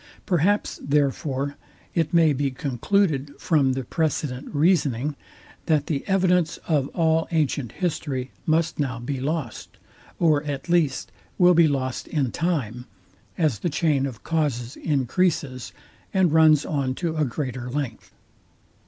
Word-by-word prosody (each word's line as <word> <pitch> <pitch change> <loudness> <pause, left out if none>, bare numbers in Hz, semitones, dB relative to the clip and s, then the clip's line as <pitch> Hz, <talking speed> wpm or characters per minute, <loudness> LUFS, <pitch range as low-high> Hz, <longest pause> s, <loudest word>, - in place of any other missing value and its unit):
Perhaps, 190 +4 +1
therefore, 140 -1 0 0.4
it 165 -3 0
may 165 -3 +5
be 140 +1 0
concluded 140 - 0
from 140 -6 +2
the 130 0 -3
precedent 150 -3 -2
reasoning, 145 -4 +2 0.5
that 150 -3 +2
the 145 -3 -2
evidence 180 -3 +2
of 145 -5 +2
all 160 -1 +2
ancient 145 -7 0
history 140 -7 -3 0.2
must 160 0 +1
now 130 -5 -1
be 130 +3 -4
lost; 145 -3 -4 0.4
or 155 -4 +3
at 145 +1 -4
least, 170 -5 +1 0.3
will 180 0 +6
be 170 -1 +6
lost 130 -3 -2
in 140 -6 -1
time, 125 -9 -2 0.5
as 155 - +1
the 175 - -1
chain 150 -3 +1
of 120 -5 -9
causes 140 -6 -1
encreases, 140 - -1 0.4
and 185 -4 +4
runs 155 -2 +5
on 135 -3 -1
to 165 0 -2
a 155 - +1
greater 125 -2 -3
length. 130 -4 -4
145 Hz, 135 wpm, -24 LUFS, 130-165 Hz, 0.5 s, will